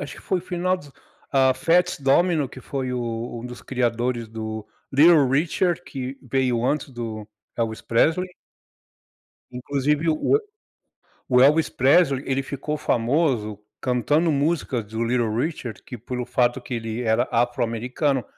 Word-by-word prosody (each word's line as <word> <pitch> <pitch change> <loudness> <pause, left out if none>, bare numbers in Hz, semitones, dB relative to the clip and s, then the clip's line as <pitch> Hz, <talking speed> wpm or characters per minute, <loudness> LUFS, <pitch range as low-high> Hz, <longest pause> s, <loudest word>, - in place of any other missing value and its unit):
acho 145 - -6
que - - -12
foi 190 - 0
o - - -6
final 180 +1 -1
dos, 145 -6 -14 0.4
ah, 130 -1 +4
Fats 180 +5 +2
Domino, 145 +2 +2
que 130 - -11
foi 130 -1 -4
o 120 -1 -4
um 120 - -6
dos 125 0 -10
criadores 120 -2 -1
do 110 -1 -6 0.3
Little 150 0 +6
Richard, 170 +5 +1
que 135 -3 -6
veio 125 -2 0
antes 145 +1 0
do 115 -4 -6 0.3
Elvis 110 -2 -2
Presley 165 +10 +1 1.2
Inclusive, 140 +5 -1
o 160 - +3 0.9
o 125 - +6
Elvis 150 +4 +5
Pesley, 135 0 +3
ele 135 0 0
ficou 140 +3 -4
famoso 120 -5 0 0.2
cantando 145 +6 +1
músicas 140 -5 0
do 110 +2 -6
Little 120 -2 0
Richard, 125 - -3
que 125 - -7
pelo 125 +2 -5
fato 125 0 +1
que 125 - -6
ele 115 0 -3
era 110 +1 +1
afro-americano, 120 +3 0
130 Hz, 145 wpm, -23 LUFS, 120-150 Hz, 1.2 s, Little